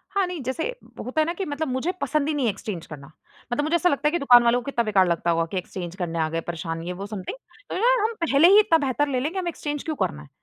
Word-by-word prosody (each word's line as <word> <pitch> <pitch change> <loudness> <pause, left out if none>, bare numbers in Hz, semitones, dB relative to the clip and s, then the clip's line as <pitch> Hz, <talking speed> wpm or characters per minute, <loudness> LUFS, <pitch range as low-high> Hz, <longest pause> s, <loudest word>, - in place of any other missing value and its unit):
हाँ 395 -2 +3
,नहीं, 355 -5 -5
जैसे 260 +6 -2 0.4
होता 285 +5 0
है - - +2
ना 340 - -2
कि 385 +1 -4
मतलब 295 +1 -3
मुझे 260 +7 -1
पसंद 305 -1 0
ही 310 - 0
नहीं 280 -4 0
है 220 - +3
एक्सचेंज 195 -3 -6
करना। 140 -2 -10 0.4
मतलब 290 +4 0
मुझे 320 +3 +1
ऐसा 355 +1 +3
लगता 285 +1 +1
है - - +2
कि 345 - 0
दुकान 245 -3 +7
वालों 235 +1 +3
को - - -15
कितना 240 -4 0
बेकार 195 -4 +3
लगता 170 0 +1
होगा 165 0 +1
कि 190 - -2
एक्सचेंज 180 -1 -5
करने 170 -3 -3
आ 160 - +2
गए, 165 +1 -2
परेशान 165 -1 -5
ये, 180 +1 -4
वो 195 +2 -6
समथिंग। 210 - -6 0.3
तो - - -4
यार, - - +3
हम 455 +1 0
पहले 290 +3 +5
ही 405 +3 +8
इतना 330 -6 +4
बेहतर 290 +3 +1
ले 260 -3 0
लेंगे 325 +8 -2
हमें 350 -2 -2
एक्सचेंज 295 -2 -4
क्यों 315 -2 -3
करना 75 - -2
है। 75 - -13
260 Hz, 295 wpm, -24 LUFS, -, 0.4 s, ही